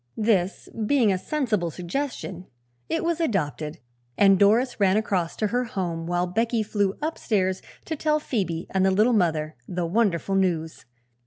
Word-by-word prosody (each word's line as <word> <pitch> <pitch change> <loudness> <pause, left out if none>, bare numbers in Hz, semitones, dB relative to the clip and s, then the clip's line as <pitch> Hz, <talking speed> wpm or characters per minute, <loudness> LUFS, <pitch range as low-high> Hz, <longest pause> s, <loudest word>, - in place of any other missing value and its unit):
This 210 -4 +1 0.2
being 240 -7 +4
a - - 0
sensible 220 - -1
suggestion, 185 - -4 0.4
it - - -1
was 335 0 0
adopted 155 - -1 0.4
and 195 -2 +5
Doris 225 +6 +3
ran 195 0 +4
across 190 -6 -1
to 215 - 0
her 245 +3 +1
home 175 -8 -3
while 175 0 +1
Becky 225 +5 0
flew 205 -2 0
upstairs 200 - 0 0.2
to 320 - -3
tell 305 0 +1
Phoebe 185 - -2
and 190 -1 +2
the 190 - +4
Little 215 +6 +3
Mother 160 - +1
the 175 -1 -2
wonderful 195 -1 +1
news. 165 -7 0
195 Hz, 155 wpm, -25 LUFS, 175-230 Hz, 0.4 s, and